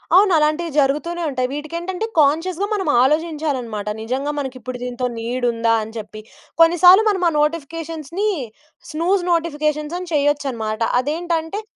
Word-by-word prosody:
అవునలాంటివి 335 -4 +3
జరుగుతూనే 300 +5 0
ఉంటయి. 255 -2 -1
వీటికేంటంటే 340 +7 -4
కాన్షియస్‌గా 330 +6 +2
మనం 385 -5 -2
ఆలోచించాలన్నమాట. 280 -7 -1
నిజంగా 260 +6 -2
మనకిప్పుడు 255 -2 -5
దీనితో 250 0 -2
నీడ్ 245 +2 -2
ఉందా? 230 0 +1
అని 220 +1 -10
చెప్పి. 215 0 -8 0.4
కొన్నిసార్లు 355 +4 +7
మనం 380 -3 0
ఆ - - -3
నోటిఫికేషన్స్‌ని 330 +4 -2 0.6
స్నూజ్ 350 +5 +1
నోటిఫికేషన్స్ 305 -1 -1
అని 360 -2 -8
చేయొచ్చన్నమాట. 275 -7 0 0.2
అదేంటంటే 325 +6 -2
305 Hz, 115 wpm, -20 LUFS, 255-340 Hz, 0.6 s, కొన్నిసార్లు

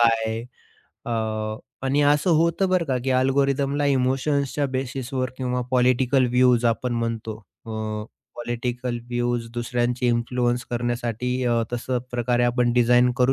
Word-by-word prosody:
काय 115 -1 +2 0.6
अ - - -3 0.8
आणि 140 +2 +2
असं 145 +4 +3
होतं 170 +4 +2
बरं 185 -2 +2
का, 130 -4 0
की 135 - 0
अल्गोरिदमला 140 +2 +1
इमोशन्सच्या 140 +2 +1
बेसिसवर, 130 -1 -3
किंवा 125 -1 -1
पॉलिटिकल 130 +1 +3
व्ह्यूज 125 -1 +4
आपण 120 +2 -2
म्हणतो 115 -2 -3 0.3
अ, - - -7 0.7
पॉलिटिकल 120 +1 -3
व्ह्यूज 120 -1 -1
दुसऱ्यांचे 120 +1 -1
इन्फ्लुअन्स 120 +1 0
करण्यासाठी 120 0 -2 0.2
अ, 120 -1 +2
तसं 125 +1 -1
प्रकारे 120 0 +1
आपण 120 0 +2
डिझाइन 125 +1 +4
करू 125 0 +3
125 Hz, 125 wpm, -24 LUFS, 120-130 Hz, 0.8 s, व्ह्यूज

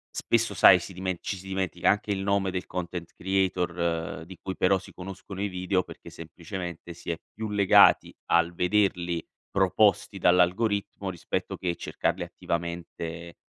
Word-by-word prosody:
spesso 115 -2 +1
sai, 95 -2 +8
si 90 +2 -8
dimen 95 0 -3
ci 100 - -3
si 95 - -12
dimentica 95 -2 -1
anche 105 +1 +2
il 100 - 0
nome 100 -1 +1
del 90 -1 -4
content 85 -1 -5
creator, 85 -4 -1
di 95 +1 -11
cui 95 - -4
però 95 +1 +4
si 95 - -13
conoscono 95 +1 -8
i 100 - 0
video 90 0 0
perché - - -12
semplicemente 85 +1 -7
si 85 - -8
è 85 - -2
più 110 0 -5
legati 100 -2 +5
al 85 0 +3
vederli 90 -2 +1 0.2
proposti 100 +1 +2
dall'algoritmo, 95 +3 +2
rispetto 90 -3 -3
che 85 -2 -2
cercarli - - -2
attivamente 85 0 -5
90 Hz, 150 wpm, -27 LUFS, 85-95 Hz, 0.2 s, sai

